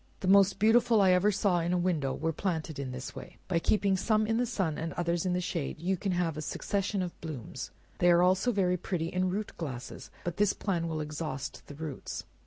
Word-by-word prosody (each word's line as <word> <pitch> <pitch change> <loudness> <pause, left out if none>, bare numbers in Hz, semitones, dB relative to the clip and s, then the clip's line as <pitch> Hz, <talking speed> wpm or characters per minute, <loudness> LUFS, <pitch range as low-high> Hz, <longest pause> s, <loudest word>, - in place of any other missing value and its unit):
The 185 - -2
most 195 0 +6
beautiful 225 +1 +4
I 190 -2 +5
ever 180 +3 +4
saw 195 -3 +2
in 170 +1 0
a - - +2
window, 170 -7 0
were 165 0 -1
planted 160 -5 -2
in 135 -2 -3
this 125 0 -6
way, - - -10
by 170 -3 +1
keeping 200 +2 +2
some 215 +3 +2
in 225 +1 +1
the 245 0 +1
sun, 190 -9 -1
and 165 +1 -3
others 170 +1 0
in 180 - +1
the 180 - +1
shade 170 -5 -3
you 185 +4 0
can 190 +1 -2
have 170 -3 0
a - - -3
succession 195 +4 -1
of 175 - -7
blooms, 150 -9 -6 0.3
they 175 - +5
are 175 0 +6
also 190 +6 +3 0.3
pretty 165 -2 -2
in 185 +1 0
root 205 +3 -3
glasses, 130 -7 -6
but 175 -1 -3
this 205 -1 +3
plan 175 -5 -1
will 160 -1 -2
exhaust 150 -2 -5
the 145 - -9
roots. 150 -3 -5
180 Hz, 220 wpm, -30 LUFS, 160-195 Hz, 0.3 s, most